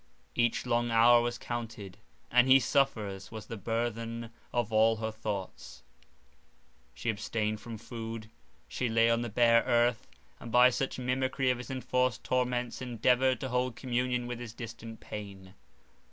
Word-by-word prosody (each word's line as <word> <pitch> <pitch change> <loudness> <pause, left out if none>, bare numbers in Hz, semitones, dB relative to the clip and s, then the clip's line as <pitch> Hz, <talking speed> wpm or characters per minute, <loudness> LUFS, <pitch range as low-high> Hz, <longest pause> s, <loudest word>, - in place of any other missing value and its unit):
Each 120 0 +1
long 120 -1 +1
hour 120 +1 +6
was 120 0 -2
counted, 115 -6 -6 0.3
and 125 +1 +5
"He 130 +1 +8
suffers" 110 -8 0
was 110 -2 -7
the - - -6
burthen 115 +1 -3 0.2
of 120 -2 -1
all 110 +1 +5
her 110 0 -3
thoughts. 100 - -6 1.1
She 120 - -1
abstained 105 0 -2
from 115 0 -7
food; 115 -1 -7 0.4
she 125 - -2
lay 115 +1 +4
on 115 0 +2
the 120 - -3
bare 115 +1 +5
earth, 120 -1 +1 0.3
and, 115 - -8
by 125 +2 +7
such 135 +2 -2
mimickry 130 +1 0
of 125 - -2
his 125 - -8
enforced 125 -2 0
torments, 125 -1 -1
endeavoured 125 +1 +2
to 130 - -3
hold 125 -1 0
communion 125 -1 -1
with 120 -1 -5
his 120 -2 -7
distant 115 -1 -8
pain. 95 -3 -8
120 Hz, 155 wpm, -30 LUFS, 110-125 Hz, 1.1 s, He